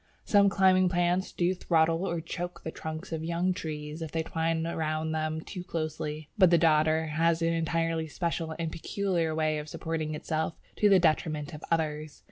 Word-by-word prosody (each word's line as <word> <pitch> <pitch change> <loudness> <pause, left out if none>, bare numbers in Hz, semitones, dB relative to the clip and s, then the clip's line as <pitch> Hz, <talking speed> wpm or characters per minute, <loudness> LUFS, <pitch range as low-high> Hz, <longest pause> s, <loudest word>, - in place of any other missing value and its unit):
Some 200 -1 +5
climbing 185 -2 +4
plants 175 +1 +1
do 175 +1 +1
throttle 165 0 +2
or 170 -1 -2
choke 175 +2 -6
the 160 - -4
trunks 160 +4 -6
of 160 -1 -3
young 170 +3 0
trees 155 -2 -6
if 160 -2 -5
they 165 -1 -1
twine 165 0 -1
round 160 -1 -1
them 155 0 -1
too 180 +2 -7
closely, 155 -3 -4
but 185 -3 +7
the 170 - +5
Dodder 160 0 +3
has 165 +2 +1
an 165 0 +2
entirely 165 0 0
special 165 0 -3
and 165 -1 -2
peculiar 170 -2 -1
way 155 -1 +1
of 150 0 -7
supporting 155 0 -3
itself 160 +1 -2 0.2
to 210 - +4
the 195 - +7
detriment 155 -2 +1
of 150 - -9
others. 155 -2 -1
160 Hz, 180 wpm, -29 LUFS, 155-175 Hz, 0.2 s, but